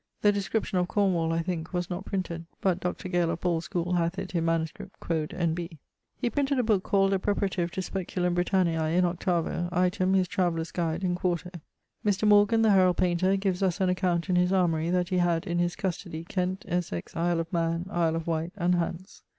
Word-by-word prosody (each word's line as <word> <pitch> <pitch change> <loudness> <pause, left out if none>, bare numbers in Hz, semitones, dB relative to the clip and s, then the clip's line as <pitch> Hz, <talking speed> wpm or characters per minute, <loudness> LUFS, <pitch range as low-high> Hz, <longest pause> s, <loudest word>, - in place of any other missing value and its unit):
The 205 - +6
description 200 -1 -1
of 180 - 0
Cornwall 180 -5 +1
(I 165 0 0
thinke) 170 -1 -4
was 175 -1 -1
not 180 +2 -4
printed; 170 -4 -3
but 185 -2 +1
Dr. 180 0 -3
Gale 175 -2 +1
of 165 0 -2
Paule's 170 -2 0
schoole 175 0 -2
hath 170 +2 0
it 195 -1 -5
in 165 -2 0
manuscript, 165 -1 -2
quod 160 -2 -2
N.B. 170 -1 -2 0.4
He - - -1
printed 280 -1 0
a 250 - +2
booke 215 -4 +2
called 195 0 +2
a 195 - +2
Preparative 190 -3 0
to 190 +1 -4
Speculum 180 -1 -2
Britanniae, 175 -3 +1
in 180 - +4
8vo; 175 0 -1
item, 185 +1 +2
his 185 -1 +3
Travellers 170 -2 -1
Guide, 170 0 -2
in 180 -1 +1
4to. 180 0 -2 0.5
Mr. 210 0 +1
Morgan, 210 +2 +5
the 220 - +5
herald 185 -3 +4
painter, 185 +1 +2
gives 195 -2 -1
us 185 -1 +1
an 190 -1 +2
account 180 -1 0
in 180 -2 +2
his 180 +1 +3
Armorie, 170 -4 +2
that 180 0 +1
he 185 -2 +1
had, 175 0 +1
in 175 -2 -1
his 175 0 0
custodie, 175 -4 -4
Kent, 185 0 -2
Essex, 170 - -3
Isle 170 0 +1
of 165 +1 -4
Man, 165 0 0
Isle 165 -3 +1
of 165 -1 -3
Wight, 165 +1 -2
and 180 -1 +2
Hants. 175 +2 -3
180 Hz, 205 wpm, -27 LUFS, 170-190 Hz, 0.5 s, The